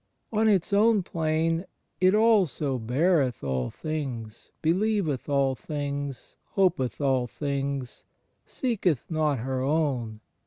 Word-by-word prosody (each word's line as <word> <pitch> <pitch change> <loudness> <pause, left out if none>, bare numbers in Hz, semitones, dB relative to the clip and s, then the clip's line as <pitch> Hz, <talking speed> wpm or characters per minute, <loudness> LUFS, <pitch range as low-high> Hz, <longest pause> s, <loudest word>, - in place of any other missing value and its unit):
On 220 +1 +3
its 195 -1 +1
own 210 -1 +4
plane, 165 +1 0 0.3
it 185 +2 +4
also 190 - +3
"beareth 130 - +1
all 65 -3 -1
things, 130 -8 -5
beUeveth 175 - +1
all 140 -2 +2
things, 140 -1 -5 0.2
hopeth 170 - +1
all 130 -3 +1
things... 140 -1 -3 0.5
seeketh 195 - 0
not 155 -3 +1
her 130 +2 -2
own 130 -7 0
145 Hz, 110 wpm, -27 LUFS, 130-180 Hz, 0.5 s, own